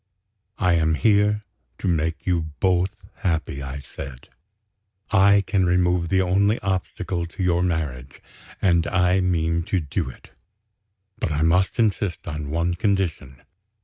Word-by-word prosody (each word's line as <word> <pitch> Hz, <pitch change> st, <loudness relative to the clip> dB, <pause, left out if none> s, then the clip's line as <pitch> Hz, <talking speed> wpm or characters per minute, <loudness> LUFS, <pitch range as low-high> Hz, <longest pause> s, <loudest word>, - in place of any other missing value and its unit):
"I 90 Hz, -2 st, +2 dB
am 80 Hz, -1 st, +2 dB
here 105 Hz, +2 st, +3 dB, 0.3 s
to -, -, -4 dB
make 80 Hz, -1 st, -1 dB
you 85 Hz, -4 st, 0 dB
both 95 Hz, +2 st, +1 dB, 0.2 s
happy," 80 Hz, -7 st, -2 dB
I 70 Hz, +1 st, -6 dB
said. 65 Hz, -2 st, -10 dB, 0.8 s
"I 100 Hz, +1 st, +5 dB
can 95 Hz, -2 st, +1 dB
remove 90 Hz, -1 st, +2 dB
the 95 Hz, -1 st, +3 dB
only 100 Hz, +4 st, +2 dB
obstacle 95 Hz, -2 st, -2 dB
to 90 Hz, +3 st, -5 dB
your 90 Hz, -1 st, +2 dB
marriage, 75 Hz, -7 st, -3 dB, 0.4 s
and 85 Hz, -3 st, +2 dB
I 90 Hz, +1 st, +2 dB
mean 85 Hz, -2 st, +1 dB
to 95 Hz, -, +2 dB
do 70 Hz, -4 st, -3 dB
it. 60 Hz, -, -14 dB, 0.9 s
But -, -, -1 dB
I 75 Hz, +1 st, 0 dB
must 90 Hz, +4 st, +2 dB
insist 100 Hz, -6 st, 0 dB
on 75 Hz, -2 st, -4 dB
one 85 Hz, +3 st, 0 dB
condition. 90 Hz, -, -2 dB
90 Hz, 140 wpm, -23 LUFS, 80-95 Hz, 0.9 s, I